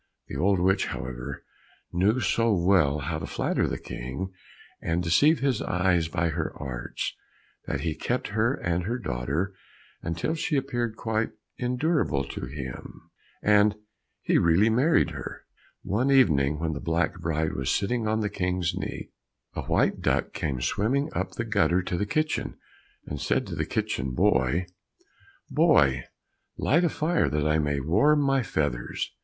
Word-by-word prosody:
The - - -6
old 95 +2 +2
witch, 95 +2 +2
however, 65 +2 -6 0.5
knew 100 +8 +3
so 115 -1 +2
well 85 -5 +3
how 80 +3 -2
to 80 - -5
flatter - - 0
the - - -2
King 65 +11 -6 0.5
and 85 +1 0
deceive 145 - +4
his 135 -2 +1
eyes 90 -2 +1
by 85 +1 0
her 80 0 -2
arts, 65 -3 -4 0.5
that - - -2
he 80 -2 -1
kept 120 +10 -2
her 110 +6 +1
and 85 -8 -1
her 120 +4 -1
daughter 75 - -2 0.5
until 85 - -2
she 155 -2 0
appeared 120 -4 -2
quite 110 -1 -1 0.3
endurable 125 - +1
to 65 - -5
him, 65 -2 -8 0.3
and 105 0 +5 0.5
he - - +3
really 90 +7 +4
married 140 +9 +3
her. - - -7 0.4
One 115 +8 0
evening 75 - +4
when 80 0 -2
the 70 - -4
black 85 +1 0
bride 80 -1 -1
was - - -2
sitting 110 +2 0
on 110 +1 +1
the 105 - 0
King's 90 -3 -1
knee, - - -5 0.4
a - - -3
white - - +2
duck - - 0
came 65 -4 -2
swimming 135 - 0
up 95 - -2
the 115 - -3
gutter 100 -4 +2
to 90 - -2
the 105 +3 -1
kitchen, 155 +6 -1 0.5
and 75 - -5
said - - +1
to - - -6
the - - -2
kitchen 65 -1 -2
boy, 65 +9 +2 0.9
"Boy, 65 -3 +4 0.5
light 165 +6 +3
a 170 - +3
fire, 165 +3 +1
that 75 0 0
I 75 +1 +3
may 75 -2 0
warm 105 - +3
my 135 -1 +3
feathers." 75 - -2
90 Hz, 160 wpm, -27 LUFS, 75-115 Hz, 0.9 s, and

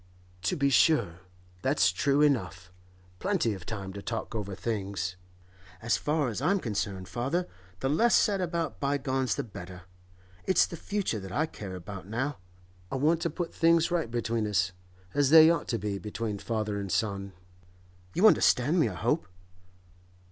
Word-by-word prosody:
'To 140 - 0
be 140 -1 +2
sure; 115 - +3 0.4
that's 95 +1 +3
true 140 +10 +2
enough. 90 - 0 0.5
Plenty 185 - +1
of 95 -3 -9
time 100 -4 -5
to 100 - -7
talk 115 +2 -4
over 100 -3 -4
things. 95 -3 -3 0.6
As 120 +4 +1
far 150 -3 0
as 115 +2 -4
I'm 195 +7 +2
concerned, 100 - -3
father, 140 +9 -1 0.3
the 135 - 0
less 230 +12 +4
said 200 -3 +3
about 170 -2 -2
bygones 135 -2 0
the - - -2
better; 90 -4 -10 0.6
it's 185 -2 +5
the - - -7
future 195 - -2
that 95 -1 -8
I 155 - +1
care 100 -11 -8
about 90 +1 -8
now. 130 +7 -2 0.5
I - - -2
want 155 +5 +2
to 170 - 0
put 170 -1 -4
things 165 0 +3
right 170 -9 0
between 115 -2 -1
us—as 95 +5 -1
they 160 +1 +9
ought 165 -3 -1
to 115 - 0
be 100 -1 -3
between 105 0 -4
father 110 -2 -2
and 100 -2 -5
son. 100 -2 -1 0.8
You 185 - +4
understand 155 - +5
me, 155 - +3
I - - -7
hope? 155 -5 0
115 Hz, 160 wpm, -29 LUFS, 100-155 Hz, 0.8 s, they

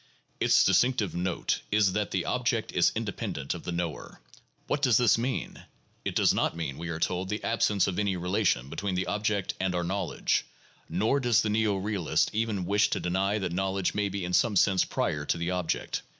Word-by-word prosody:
Its - - +4
distinctive 105 +2 +2
note 90 0 -1
is 105 -3 +3
that 105 0 -1
the - - -1
object - - -1
is - - +3
independent 70 -1 -3
of - - -7
the - - -5
knower. 85 -3 -4 0.5
What 145 - -1
does 125 -6 +4
this 120 -3 +4
mean? 125 +2 -3 0.4
It - - -3
does - - +4
not - - 0
mean, 75 -4 -4
we 85 +1 -5
are 80 -1 -4
told, 90 +2 -1
the 105 +1 -3
absence 105 -3 +2
of 95 0 -2
any 100 -3 0
relation 90 - 0
between 95 +6 -3
the 95 - 0
object 105 -2 -1
and 95 -1 0
our 90 - 0
knowledge, 95 +1 -1 0.5
nor 125 +6 +1
does 120 -4 +3
the 110 - 0
neo 110 -1 +2
realist 95 -3 0
even 110 -4 -1
wish 100 +3 +2
to - - -1
deny 95 +4 0
that 95 -4 -2
knowledge 95 0 -1
may 105 -1 0
be 95 -1 -4
in 90 - -4
some 110 +3 +3
sense 95 0 +4
prior 75 - -1
to 75 - -1
the 85 +2 -2
object. 90 -2 -2
95 Hz, 200 wpm, -28 LUFS, 90-105 Hz, 0.5 s, Its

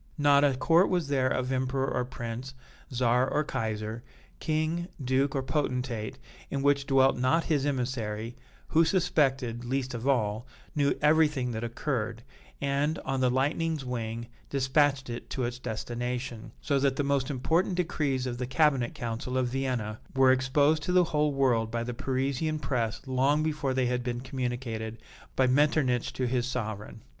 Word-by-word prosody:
Not 145 -1 +5
a 140 -2 +3
court 165 +7 +4
was 175 -6 0
there 135 -2 +2
of 130 0 -1
emperor 130 +1 0
or 125 - 0
prince, 125 +1 -6 0.4
czar 125 +1 +2
or 150 - +2
kaiser, 110 -3 -3 0.4
king, 160 +2 -1
duke 135 +1 +1
or 135 - 0
potentate 125 -5 -2 0.3
in 140 -1 -2
which 140 -1 +2
dwelt 135 -1 +4
not 130 +7 +3
his 145 -3 +1
emissary, 120 -4 -2 0.3
who 165 +1 +5
suspected, 135 -9 +1
least 130 +1 -2
of 120 +2 -4
all, 115 -3 +1 0.3
knew 140 -1 +2
everything 150 -4 +3
that 110 0 -4
occurred, 115 -2 -3 0.4
and, 140 +2 0
on 135 0 -1
the 130 -1 +3
lightning's 145 +3 0
wing, 115 -2 -3 0.2
dispatched 135 0 +2
it 120 0 -6
to 130 - -2
its 120 +1 -3
destination, 120 0 -4
so 140 -2 +2
that 135 -1 +2
the 145 - 0
most 140 -2 +1
important 165 +7 +1
decrees 150 -7 0
of 120 -1 -4
the 125 - -2
cabinet 135 -3 +2
council 120 +2 -3
of 125 -1 +1
Vienna 125 -4 -2 0.2
were 135 -1 +6
exposed 140 +4 +3
to 180 - -2
the 180 0 +5
whole 150 -3 +1
world 125 -5 +2
by 115 0 -2
the 125 +1 -4
Parisian 135 +4 -1
press 125 -7 -2
long 135 +3 +2
before 150 -4 -1
they 130 -1 +2
had 125 0 0
been 120 -1 -2
communicated 120 -3 -4 0.4
by 130 - +4
Metternich 130 -2 +2
to 130 - -1
his 125 0 0
sovereign. 110 -3 -5
130 Hz, 165 wpm, -29 LUFS, 120-145 Hz, 0.4 s, were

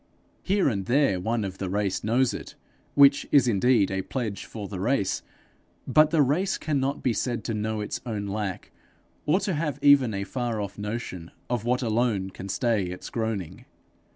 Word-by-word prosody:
Here 200 0 +2
and 100 -7 -1
there 130 -7 +3
one 110 +4 -1
of 95 -1 -6
the 95 - -3
race 100 0 -1
knows 120 +4 +2
it - - -8 0.4
which 140 0 +6
is 135 -4 +5
indeed 110 -1 +3
a 95 0 -1
pledge 110 0 -4
for 105 -3 -7
the 95 -2 -6
race 100 -1 0 0.6
but 155 0 +5
the 155 -2 +4
race 180 +9 +1
cannot 140 -2 -1
be 125 - +2
said 120 +2 -2
to 115 - -3
know 110 0 -2
its 105 - -4
own 105 -4 -3
lack, 100 -2 -4 0.6
or 160 +6 +4
to 190 - -1
have 150 -3 -2
even 140 -6 +5
a 100 - -2
far 120 +2 -3
off 100 0 -5
notion 105 -5 -5 0.2
of 120 -2 -1
what 125 +2 +1
alone 110 -4 0
can 95 +1 -8
stay 115 -2 +1
its 90 +1 -7
groaning. 110 -7 -3
115 Hz, 180 wpm, -26 LUFS, 100-135 Hz, 0.6 s, which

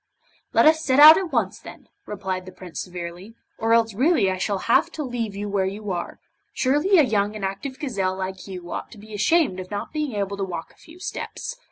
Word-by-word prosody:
'Let - - +4
us 315 0 +5
set 260 -1 +2
out 310 +3 +11
at 365 -4 -4
once 220 -7 0
then,' - - -12 0.2
replied 190 -2 -4
the - - -8
Prince 180 -2 -8
severely, 180 +4 -8 0.2
'or 225 0 0
else 225 -2 +2
really 250 - +3
I 185 - -3
shall 200 +1 0
have 325 +8 +3
to 305 - -4
leave 235 -6 -4
you 205 +1 -4
where 200 -2 0
you 205 +1 -5
are. 175 -1 -4 0.3
Surely 295 +9 +3
a 315 - +7
young 210 -4 0
and 205 -2 -3
active 195 +8 -5
gazelle 195 -10 -2
like 190 0 -5
you 180 -2 -8
ought - - -5
to - - -14
be 215 +1 -12
ashamed 215 - +2
of 185 0 -7
not 205 +6 -5
being 300 -5 -2
able 200 -1 -2
to 200 - -2
walk 175 -3 -5
a - - -25
few 325 +2 -16
steps. 370 +6 -6
205 Hz, 225 wpm, -23 LUFS, 190-265 Hz, 0.3 s, out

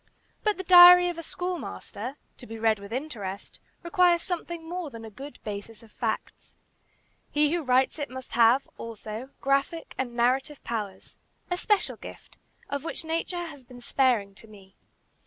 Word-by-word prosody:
But 425 -1 +1
the 380 - -4
"Diary 355 0 +9
of 340 -1 -5
a - - -3
Schoolmaster," 285 - -5 0.2
to 245 - -11
be 225 - -7
read 220 -1 +2
with 200 +1 -11
interest, 225 -8 -5 0.2
requires 345 -1 +3
something 340 -2 -4
more 350 -2 -4
than 230 -3 -9
a 220 - -9
good 275 +7 -10
basis 210 +2 -7
of 220 - -17
facts. 220 -1 -4 0.7
He 300 +1 +2
who 345 - 0
writes 260 +1 +2
it 290 - -3
must 260 0 -9
have, 240 +3 +5
also, 225 +2 -7
graphic 275 +5 0
and 245 -2 -2
narrative 260 +5 +1
powers 205 -5 -5 0.3
a 355 - +1
special 415 +2 +1
gift, - - -12 0.3
of 280 0 -3
which 330 - -4
nature 335 +2 -2
has 285 -5 -10
been 245 0 -13
sparing 240 -5 +1
to 220 +3 -15
me. 195 -3 -16
265 Hz, 165 wpm, -27 LUFS, 225-335 Hz, 0.7 s, Diary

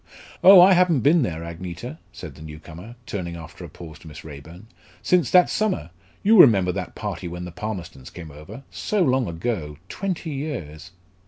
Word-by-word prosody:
"Oh, 190 0 +10
I 185 +2 +8
haven't 175 -6 +3
been 155 +7 +4
there, 85 - -3
Agneta," 85 +1 -8
said - - -10
the - - -15
new 75 -1 -9
comer, 85 +9 -12
turning 90 -6 -5
after 85 +2 -11
a 85 - -9
pause 80 0 -12
to - - -15
Miss 75 -1 -11
Raeburn, 80 +6 -12 0.4
"since 180 -7 +2
that 180 -1 +6
summer 190 - -2 0.3
you 215 0 +5
remember 95 -8 +5
that 90 -1 -6
party - - -5
when 90 +1 -6
the 90 - -8
Palmerstons 90 -7 -7
came 80 -3 -10
over 80 - -11
so 210 -4 -1
long 130 -5 +1
ago 85 -4 -4
twenty 180 - -4
years!" 90 - -6
90 Hz, 180 wpm, -23 LUFS, -, 0.4 s, Oh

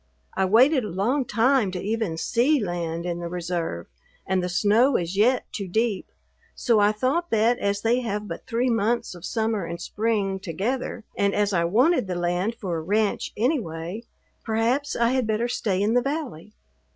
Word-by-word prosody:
I 190 - +2
waited 255 +8 +4
a 210 - -4
long 235 +10 0
time 230 0 +2
to 180 - -3
even 210 -4 -2
see 255 - +2
land 170 -4 -3
in 175 -1 -3
the 170 - -4
reserve, 170 - -3 0.4
and 190 -1 +1
the 180 - -2
snow 215 +9 +3
is 175 +2 -3
yet 240 +5 +3
too 200 -5 -4
deep, 220 +1 -1 0.4
so 230 -4 +2
I 205 0 +4
thought 265 +11 -1
that 230 +2 +2
as 200 0 -1
they 235 +2 +3
have 210 -3 -3
but 165 - -8
three 245 +1 +1
months 230 0 0
of 175 -2 -12
summer 220 -3 -1
and 170 0 -5
spring 205 -1 -1
together 215 +7 -3
and 200 0 +1
as 205 -1 +1
I 170 -2 +2
wanted 245 - +3
the 180 - -3
land 175 +5 -1
for 185 -7 -3
a - - -3
ranch 205 +5 0
anyway, 210 - -2 0.4
perhaps 235 +6 0
I 235 0 +2
had 255 -2 0
better 220 +2 0
stay 200 -5 -1
in 210 +3 +1
the 245 - +4
valley. 260 - -4
210 Hz, 185 wpm, -24 LUFS, 180-240 Hz, 0.4 s, waited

